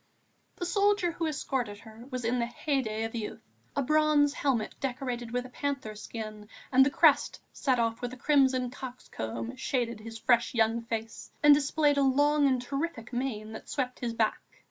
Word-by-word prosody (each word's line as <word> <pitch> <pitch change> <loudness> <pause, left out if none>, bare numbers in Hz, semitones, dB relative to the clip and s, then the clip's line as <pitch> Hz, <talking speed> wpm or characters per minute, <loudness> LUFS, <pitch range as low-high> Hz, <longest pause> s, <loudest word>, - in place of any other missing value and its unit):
The 350 - -4
soldier 400 -1 +2
who 330 0 -2
escorted 265 -8 -2
her 225 +2 -13
was 255 -3 -4
in 245 +2 +1
the 235 - 0
heyday 240 -4 -1
of 225 - -4
youth. 225 -3 -5 0.3
A 280 - +1
brazen 305 0 +4
helmet 270 -6 -1
decorated 250 -2 -3
with 245 +1 -2
a - - -9
panther 270 -4 -3
skin 215 -1 -7 0.2
and 265 0 +7
the 270 - +3
crest - - +4
set 260 -3 +1
off 230 0 0
with 245 -1 -3
a 255 - -9
crimson 260 -3 +3
cock's 250 -1 -8
comb 115 +1 -5
shaded 235 -4 -1
his 225 +1 -8
fresh 235 +1 +2
young 225 0 +2
face 225 -1 -5
and 295 0 +9
displayed 290 0 +2
a - - +4
long 290 +2 +4
and 255 -2 +1
terrific 275 -3 -4
mane 235 -4 -3
that 220 - -9
swept 255 -3 -2
his 235 -2 -3
back. 220 -1 +1
250 Hz, 185 wpm, -29 LUFS, 225-280 Hz, 0.3 s, and